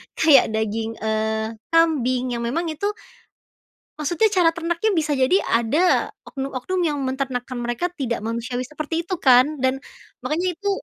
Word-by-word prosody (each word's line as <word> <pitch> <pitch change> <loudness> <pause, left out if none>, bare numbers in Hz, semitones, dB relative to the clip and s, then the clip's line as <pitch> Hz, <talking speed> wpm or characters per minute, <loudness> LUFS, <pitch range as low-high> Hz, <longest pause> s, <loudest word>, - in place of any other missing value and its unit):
kayak 295 -5 +6
daging, 220 +1 -2
eee, 220 0 -1 0.2
kambing 255 -6 +2
yang - - -3
memang 320 +9 -1
itu 355 +7 -2 1.1
maksudnya 345 +9 +2
cara 360 -4 +4
ternaknya 340 +5 0
bisa 310 -1 0
jadi 265 +8 +3 0.2
ada 260 +11 +2 0.2
oknum-oknum 275 +6 -3
yang 295 - -2
menternakkan 260 -1 -3
mereka 240 +8 -1
tidak 245 -6 -2
manusiawi 235 +2 -3
seperti 310 +3 -4
itu 370 - -2
kan, 260 +2 +4
dan 260 0 +2 0.5
makanya 340 +6 -1
itu 405 +4 -4
265 Hz, 140 wpm, -22 LUFS, 240-330 Hz, 1.1 s, kayak